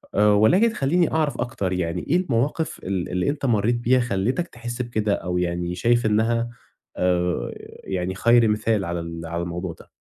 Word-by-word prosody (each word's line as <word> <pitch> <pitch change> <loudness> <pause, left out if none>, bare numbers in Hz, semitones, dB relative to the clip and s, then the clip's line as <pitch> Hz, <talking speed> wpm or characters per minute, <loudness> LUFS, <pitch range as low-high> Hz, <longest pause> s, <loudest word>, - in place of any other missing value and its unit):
آآ 105 +1 +4
ولكن 180 - +4
خلّيني 165 +1 +1
أعرف 155 -2 0
أكتر 95 -6 -2
يعني، 90 -1 -2
إيه 175 - +4
المواقف 150 0 -1
ال 95 -2 -2
اللي 90 +4 0
أنت 140 -1 -3
مرّيت 115 0 +2
بيها 120 +2 +2
خلِّتك 120 - -1
تحسّ 120 -1 -6
بكده 110 -4 -1
أو 90 -2 -2
يعني 85 0 -1
شايف 120 +6 +2
إنها 115 +2 +1 0.5
آآ 90 -1 0 0.3
يعني 95 0 -3
خير 115 +2 +4
مثال 105 -1 +1
على 85 0 -3
ال 85 0 -6
على 85 +1 -3
الموضوع 85 0 -4
ده؟ - - -16
110 Hz, 175 wpm, -23 LUFS, 90-120 Hz, 0.5 s, آآ